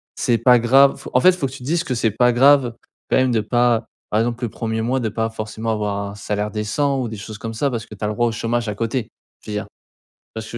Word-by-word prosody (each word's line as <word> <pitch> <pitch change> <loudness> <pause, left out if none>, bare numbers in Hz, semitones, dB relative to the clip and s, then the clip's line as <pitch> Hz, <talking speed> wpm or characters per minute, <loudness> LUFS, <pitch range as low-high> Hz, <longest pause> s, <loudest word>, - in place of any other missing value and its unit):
c'est 120 -1 +1
pas 125 +2 +6
grave, 135 +4 +4
en 125 - +5
fait, 185 - +6
faut 180 -5 -3
que - - -10
tu 135 - -10
dises 165 +6 0
que, 130 - -3
c'est 115 -1 +1
pas 125 +3 +3
grave, 130 -1 +5 0.4
quand - - +4
même 130 -1 +3
de 110 - +2
pas 120 +1 +1 0.3
par 105 - +2
exemple, 120 +1 -2
le 115 - -4
1er 110 0 -3
mois, 130 +3 0
de 110 - -1
pas 110 +1 -2
forcément 110 0 -5
avoir 100 -2 -2
un - - -11
salaire 105 0 -3
décent. 110 +7 -1
Ou 120 - -3
des 110 - -7
choses 105 +1 -8
comme 115 0 -6
ça. 140 +6 0
Parce 115 -2 -4
que, - - -12
tu 105 - -10
as - - 0
le 105 - -2
droit 120 +3 +1
au 115 - -1
chômage 115 +1 -1
à 105 - -2
côté. 115 +2 -2 0.3
Je 110 - -8
veux 105 - -3
dire. 105 - -4
Tu - - -20 0.7
vois 110 - -4
ce - - -10
que 115 - -7
115 Hz, 290 wpm, -20 LUFS, 110-125 Hz, 0.7 s, pas